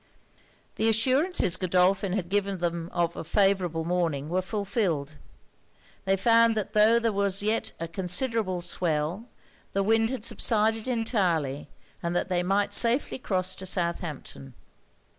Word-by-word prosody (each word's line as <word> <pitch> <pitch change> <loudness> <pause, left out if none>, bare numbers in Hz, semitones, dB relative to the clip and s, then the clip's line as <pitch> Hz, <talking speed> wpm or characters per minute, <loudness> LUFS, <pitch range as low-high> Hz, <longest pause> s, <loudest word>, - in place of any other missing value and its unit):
The 225 - +2
assurances 255 - +2
Godolphin 185 +1 +1
had 190 -4 -2
given 200 0 -1
them 170 -1 -3
of 170 -1 -1
a - - -5
favourable 185 -3 +1
morning 165 -5 -1
were 185 +2 0
fulfilled. 185 - -2 0.9
They 195 0 +2
found 230 +1 +4
that 215 0 -3
tho' 215 +2 +5
there 230 -1 +1
was 200 0 0
yet 215 +2 0
a 165 - -4
considerable 185 +2 -1
swell, 170 +3 -2 0.5
the 195 - +1
wind 225 +2 +2
had 255 -3 -4
subsided 220 0 +1
entirely, 185 - -1 0.3
and 170 +1 -3
that 175 - -1
they 180 -1 +1
might 195 +3 0
safely 245 +3 +2
cross 185 -5 -1
to 190 0 -7
Southampton. 170 - -3
190 Hz, 140 wpm, -27 LUFS, 175-220 Hz, 0.9 s, tho